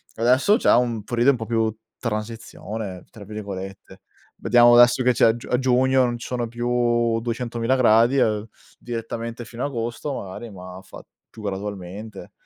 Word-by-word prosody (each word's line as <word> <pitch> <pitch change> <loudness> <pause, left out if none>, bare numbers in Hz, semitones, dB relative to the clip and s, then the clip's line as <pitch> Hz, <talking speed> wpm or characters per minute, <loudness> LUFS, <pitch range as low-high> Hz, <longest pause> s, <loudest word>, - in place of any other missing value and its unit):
Adesso 130 - +3
c'è - - +3
un 120 -3 0
periodo 120 +4 +3
un 130 - -2
po' 110 - -5
più 110 -1 0 0.3
"transizione", 110 -3 -5
tra 110 -3 -12
virgolette. 100 -2 -8 0.4
Vediamo 120 +1 +6
adesso 120 +1 +6
che 125 0 +3
c'è - - +4
a 110 - +3
giu 120 - -10
a 125 - +2
giugno 130 0 +3
non 120 -1 -1
ci - - -8
sono 120 -2 -2
più 120 -1 0
duecentomila 120 +1 -1
gradi, 120 +1 +4
uhm, 110 -2 +1 0.3
direttamente 115 0 -5
fino 120 +2 -7
a - - 0
agosto 120 +2 -4
magari, 100 +2 -7
ma 90 -1 -10
fa 95 - -13 0.3
più 110 - -13
gradualmente. 100 +1 -6
115 Hz, 165 wpm, -23 LUFS, 110-120 Hz, 0.4 s, Vediamo